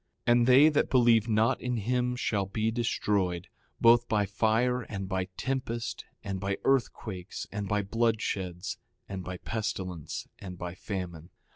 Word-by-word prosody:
6:15 - - +4
And 120 0 +4
they 135 +4 +8
that 150 - +1
believe 120 -3 +4
not 110 +1 +2
in 125 -1 -1
him 125 +3 0
shall 100 -5 0
be 110 +3 0
destroyed, 100 -6 0 0.3
both 120 +1 +5
by 105 -2 +2
fire, 115 +5 +1
and 100 -4 -5
by 95 -1 -1
tempest, 125 -3 -3 0.2
and 95 -3 -3
by 95 0 -1
earthquakes, 110 -8 -1
and 100 0 -3
by 105 +1 +1
bloodsheds, 100 -4 -1 0.3
and 95 -2 -5
by 90 +1 -5
pestilence, 90 -7 -4
and 90 -2 -8
by 90 0 -5
famine. 90 -4 -6
105 Hz, 150 wpm, -29 LUFS, 95-120 Hz, 0.3 s, they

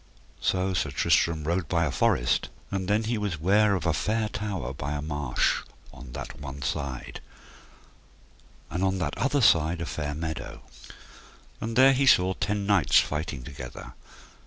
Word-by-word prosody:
So 95 +1 +1
Sir 85 -4 0
Tristram 80 +3 +2
rode 85 +3 -1
by 85 -2 +2
a 75 - -1
forest, - - +1 0.2
and 95 -2 -2
then 105 +2 +2 0.2
was 100 -5 -1
he - - -10
ware 100 +2 +4
of 90 - -3
a 85 - +2
fair 110 +6 0
tower 100 - -4
by 70 +2 -4
a 75 - -3
marsh 75 -4 0 0.3
on 60 -1 -11
that - - -7
one 70 0 -7
side, 70 -4 -4 1.5
and 90 +2 -1
on 95 0 +1
that 80 -5 -2
other 140 +2 +1
side 85 -6 +4
a 85 - -3
fair 75 -2 -4
meadow. 80 0 -5 1.0
And 115 +1 -4
there 135 +2 +7
he 135 +1 +2
saw 95 -5 +5
ten 105 +1 -2
knights 100 -7 +4
fighting 75 -4 -3
together. 70 +3 -9
85 Hz, 160 wpm, -27 LUFS, 75-100 Hz, 1.5 s, there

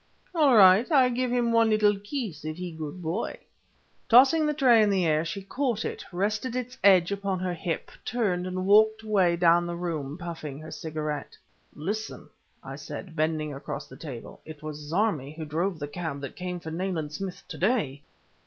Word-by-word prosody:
"All 295 -8 +5
right. 195 - +7
I 265 -4 +5
give 250 +1 -1
him 240 -1 +1
one 230 -1 +4
little 210 -1 +4
kiss 205 - -5
if 155 +1 -5
he 180 -1 -5
good 160 +2 -7
boy!" 170 +8 -3 0.7
Tossing 275 +6 +6
the 300 - +1
tray 250 -6 +5
in 210 - +4
the 190 -3 +2
air 155 -1 +2
she 190 +4 -5
caught 240 +1 -2
it, - - -4
rested 210 +7 -1
its 250 0 -4
edge 185 -2 +6
upon 200 -1 -1
her 180 0 -2
hip, 165 -1 -4
turned, 190 -7 -1
and 185 0 -3
walked 220 +2 +5
away 190 -5 +2
down 175 0 +4
the 175 - -4
room, 160 -4 -4
puffing 165 -5 -6
her 155 +1 -10
cigarette. 155 -2 -5 0.4
"Listen," 210 +8 -4 0.4
I - - -7
said, 175 -4 -8
bending 155 -1 -1
across 140 - -6
the - - -12
table, 130 -7 -9
"it 155 -1 -11
was 155 -1 -6
Zarmi 155 -2 -1
who 160 - -5
drove 170 +5 -1
the 145 -1 -5
cab 145 -1 -5
that 140 - -7
came 180 -1 -4
for 160 -1 -7
Nayland 165 -3 -3
Smith 190 +3 -6
to - - -7
day!" 185 - 0
180 Hz, 190 wpm, -27 LUFS, 160-220 Hz, 0.7 s, right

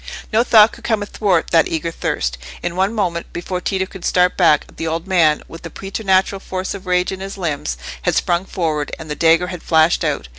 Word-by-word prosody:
No 225 +2 +4
thought 220 -2 +6
could - - -14
come 220 -3 0
athwart 200 -4 0
that 165 -1 +4
eager 165 +1 -2
thirst. - - -2 0.2
In 175 - -3
one 190 +2 +1
moment, 180 -6 -2
before 180 +1 -4
Tito 190 0 -1
could 190 -1 -12
start 180 0 +2
back, 165 -5 +4
the 165 - -3
old 165 +2 -2
man, 165 -6 +3
with 165 - -11
the 165 - -7
preternatural 195 +1 0
force 185 -1 -4
of 195 -1 -9
rage 180 0 +1
in 190 - -5
his 195 +1 -7
limbs, 145 - -3 0.2
had - - 0
sprung 175 +2 +1
forward, 155 -6 -2
and 160 -2 -8
the - - -2
dagger 165 +3 +3
had 175 - -7
flashed 160 0 +3
out. - - -1
180 Hz, 215 wpm, -19 LUFS, 165-190 Hz, 0.2 s, thought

